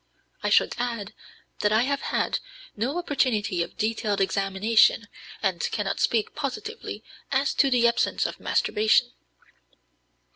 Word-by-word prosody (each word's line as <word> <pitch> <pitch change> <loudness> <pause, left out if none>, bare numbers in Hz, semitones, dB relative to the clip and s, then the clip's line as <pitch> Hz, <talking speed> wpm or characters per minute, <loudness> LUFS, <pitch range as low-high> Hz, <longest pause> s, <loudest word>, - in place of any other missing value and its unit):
I - - 0
should - - +4
add 230 -4 -3 0.5
that 210 - +2
I 220 +2 +4
have 280 +1 -1
had - - -1 0.4
no 250 +10 -2
opportunity 230 - 0
of 170 - -5
detailed 215 -2 -1
examination, 200 +3 +2 0.4
and 185 -4 0
cannot 205 -3 -2
speak 225 -3 +1
positively 305 - -5 0.3
as 275 +1 +1
to 275 - +3
the 245 -2 +4
absence 235 - +1
of - - -4
masturbation. 215 +1 +2
225 Hz, 125 wpm, -25 LUFS, 205-260 Hz, 0.5 s, should